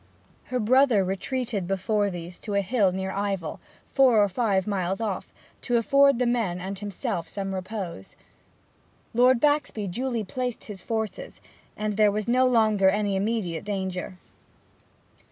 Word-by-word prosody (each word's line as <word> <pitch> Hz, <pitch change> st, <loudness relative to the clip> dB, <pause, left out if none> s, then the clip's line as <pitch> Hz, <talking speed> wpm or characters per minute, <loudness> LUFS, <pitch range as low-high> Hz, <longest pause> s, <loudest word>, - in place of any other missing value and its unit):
Her 255 Hz, -, -2 dB
brother 245 Hz, -2 st, +4 dB
retreated 200 Hz, +1 st, -2 dB
before 200 Hz, +2 st, 0 dB
these 175 Hz, -1 st, -8 dB
to 205 Hz, -3 st, -4 dB
a 200 Hz, -, +3 dB
hill 200 Hz, -1 st, +2 dB
near 190 Hz, +1 st, -3 dB
Ivell, 195 Hz, -5 st, -3 dB, 0.3 s
four 260 Hz, -5 st, +5 dB
or 205 Hz, -, +1 dB
five 195 Hz, -2 st, +1 dB
miles 190 Hz, -2 st, -1 dB
off, 210 Hz, -5 st, -3 dB, 0.3 s
to 245 Hz, -2 st, +1 dB
afford 275 Hz, +4 st, +4 dB
the 250 Hz, -, +1 dB
men 225 Hz, -7 st, 0 dB
and 190 Hz, +1 st, -5 dB
himself 195 Hz, -4 st, -4 dB
some 195 Hz, -1 st, -4 dB
repose. 185 Hz, -, -6 dB, 1.0 s
Lord 250 Hz, +1 st, +5 dB
Baxby 290 Hz, -7 st, +1 dB
duly 235 Hz, +4 st, -2 dB
placed 250 Hz, +3 st, -4 dB
his 200 Hz, -4 st, -9 dB
forces, 225 Hz, -, -4 dB, 0.4 s
and 210 Hz, -1 st, -2 dB
there 210 Hz, -1 st, +5 dB
was 210 Hz, +1 st, -3 dB
no 255 Hz, +2 st, +4 dB
longer 215 Hz, -5 st, +4 dB
any 205 Hz, 0 st, 0 dB
immediate 190 Hz, -5 st, -1 dB
danger. 190 Hz, -2 st, -4 dB
205 Hz, 145 wpm, -26 LUFS, 190-235 Hz, 1.0 s, four